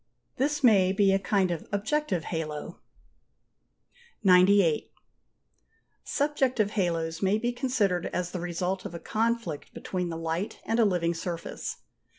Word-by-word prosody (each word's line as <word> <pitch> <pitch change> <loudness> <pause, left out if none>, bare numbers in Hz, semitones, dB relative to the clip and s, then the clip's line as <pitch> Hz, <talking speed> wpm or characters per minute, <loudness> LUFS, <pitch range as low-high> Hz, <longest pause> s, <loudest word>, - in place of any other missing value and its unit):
This 290 +2 0
may 195 -6 +5
be 195 0 +3
a 195 - +3
kind 195 -2 +1
of 170 - -4
objective 205 - 0
halo. 155 -3 -5 1.4
(88.) 190 - +5
98. 180 -3 +4 1.1
Subjective 265 -7 +1
halos 165 -5 -1
may 195 +2 +3
be 240 +2 -1
considered 240 -8 0
as 180 -1 -3
the 185 - -4
result 180 +2 -2
of 170 - -7
a - - -5
conflict 225 -8 -2
between 180 -2 -3
the 165 - -4
light 165 +5 -3
and 225 +2 0
a 230 - +6
living 175 -4 +1
surface. 170 0 -5
190 Hz, 140 wpm, -28 LUFS, 170-220 Hz, 1.4 s, a